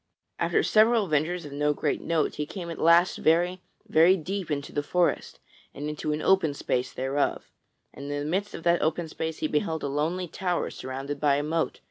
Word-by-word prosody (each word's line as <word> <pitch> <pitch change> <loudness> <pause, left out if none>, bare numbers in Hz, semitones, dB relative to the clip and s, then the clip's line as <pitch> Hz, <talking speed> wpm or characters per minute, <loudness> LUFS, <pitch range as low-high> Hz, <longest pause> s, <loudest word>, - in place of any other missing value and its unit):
After - - +2
several 220 +1 +4
adventures 165 0 -1
of 145 - -8
no 150 +1 +1
great 150 - -1
note 165 -2 0
he 150 0 -4
came 175 -2 -6
at - - -7
last 170 +2 +4
very, 175 +3 +2 0.3
very 170 +4 +5
deep 185 +2 -4
into 140 -2 -3
the 145 - 0
forest 175 +4 0 0.4
and 145 +2 -5
into 150 0 -3
an 150 +1 -2
open 190 -7 +3
space 125 -2 -1
thereof; 135 +2 -2 0.4
and 140 - -9
in 145 - -2
the 145 - -3
midst 190 +6 -2
of - - -8
that 170 0 +3
open 160 +2 0
space 160 0 -4
he - - +2
beheld 160 +1 -1
a - - 0
lonely 160 +6 -1
tower 175 +1 -2
surrounded 135 +2 -5
by 145 -1 +3
a 145 - -1
moat. 160 +2 -1
160 Hz, 200 wpm, -27 LUFS, 145-175 Hz, 0.4 s, very